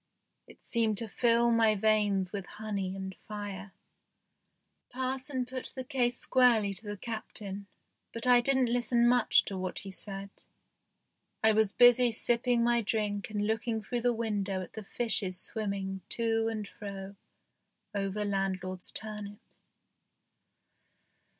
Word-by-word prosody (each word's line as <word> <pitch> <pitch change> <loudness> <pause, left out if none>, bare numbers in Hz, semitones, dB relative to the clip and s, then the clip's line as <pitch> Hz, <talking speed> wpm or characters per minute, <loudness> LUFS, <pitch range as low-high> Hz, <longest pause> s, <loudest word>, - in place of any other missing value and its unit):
It - - -17
seemed 225 -3 +1
to 230 - -2
fill 235 +2 +3
my 225 -2 +4
veins 205 -3 +2
with 195 -3 -5
honey 200 -3 -3
and 190 0 -5
fire. 200 -2 -6 1.2
Parson 260 +1 -2
put 255 0 -7
the 260 - -4
case 245 -3 0
squarely 235 -6 +4
to 205 +3 0
the 205 0 -4
Captain, 205 -2 -4 0.4
but 230 - -3
I 245 -1 +6
didn't 260 -2 +2
listen 240 0 +2
much 245 -1 +4
to 195 -2 -4
what 185 -1 -4
he 195 - -6
said; 195 +1 -5 1.1
I 220 - +6
was 215 -2 +3
busy 245 0 +6
sipping 235 +1 +1
my 235 0 +3
drink 210 -1 -1
and 210 -1 -1
looking 225 0 -1
through 240 +2 -2
the 245 +1 +3
window 205 -5 -1
at 175 - -12
the 220 - -7
fishes 195 -5 0
swimming 195 -3 -3
to 225 -1 +1
and 215 -2 -3
fro 200 -1 -8 0.8
over 200 +1 -2
landlord's 185 -2 -2
turnips. 210 -2 -8
215 Hz, 135 wpm, -30 LUFS, 200-235 Hz, 1.2 s, I